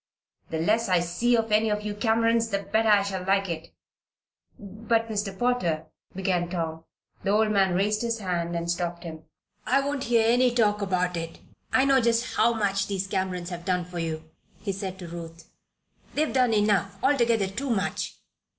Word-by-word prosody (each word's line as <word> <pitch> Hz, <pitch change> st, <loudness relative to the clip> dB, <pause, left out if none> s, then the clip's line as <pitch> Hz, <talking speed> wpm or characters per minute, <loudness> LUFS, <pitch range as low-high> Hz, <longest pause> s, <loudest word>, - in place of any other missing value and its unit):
The 160 Hz, -, -2 dB
less 215 Hz, +7 st, +1 dB
I 180 Hz, -1 st, +4 dB
see 175 Hz, +8 st, +1 dB
of 225 Hz, -1 st, -1 dB
any 215 Hz, +1 st, +3 dB
of 210 Hz, 0 st, -1 dB
you 210 Hz, -1 st, -3 dB
Camerons 230 Hz, +2 st, +2 dB
the 200 Hz, -1 st, -1 dB
better 220 Hz, +2 st, +1 dB
I 205 Hz, -1 st, +5 dB
shall 195 Hz, -2 st, -3 dB
like 195 Hz, +1 st, +2 dB
it." 165 Hz, -1 st, -5 dB, 0.9 s
"But, 225 Hz, +3 st, -1 dB
Mr. 205 Hz, -3 st, -3 dB
Potter 180 Hz, -11 st, 0 dB
" -, -, -36 dB
began 180 Hz, -2 st, 0 dB
Tom. 165 Hz, -2 st, -4 dB, 0.4 s
The 195 Hz, -, -2 dB
old 215 Hz, +1 st, +3 dB
man 190 Hz, -3 st, +3 dB
raised 210 Hz, +3 st, +1 dB
his 230 Hz, -1 st, -1 dB
hand 175 Hz, -4 st, -2 dB
and 170 Hz, 0 st, -1 dB
stopped 175 Hz, 0 st, -3 dB
him. 160 Hz, -2 st, -8 dB, 0.4 s
"I 265 Hz, +2 st, +4 dB
won't 275 Hz, 0 st, -2 dB
hear 230 Hz, -1 st, +3 dB
any 245 Hz, +1 st, +3 dB
talk 210 Hz, -3 st, +2 dB
about 180 Hz, -2 st, 0 dB
it. 165 Hz, 0 st, -5 dB, 0.3 s
I 260 Hz, -, +4 dB
know 270 Hz, -1 st, +4 dB
just 235 Hz, +1 st, +1 dB
how 235 Hz, -, +4 dB
much 200 Hz, -3 st, 0 dB
these 195 Hz, -1 st, -2 dB
Camerons 185 Hz, -2 st, -2 dB
have 175 Hz, -1 st, -6 dB
done 180 Hz, -1 st, 0 dB
for 180 Hz, 0 st, -6 dB
you," 160 Hz, -1 st, -4 dB, 0.3 s
he 200 Hz, -, -3 dB
said 190 Hz, -1 st, -5 dB
to 180 Hz, -2 st, -8 dB
Ruth. 165 Hz, 0 st, -9 dB, 0.6 s
"They've 305 Hz, +1 st, +1 dB
done 255 Hz, -3 st, +3 dB
enough 205 Hz, -2 st, +1 dB
altogether 235 Hz, -6 st, +3 dB
too 230 Hz, +9 st, -4 dB
much. 200 Hz, -4 st, -2 dB
200 Hz, 185 wpm, -26 LUFS, 175-230 Hz, 0.9 s, I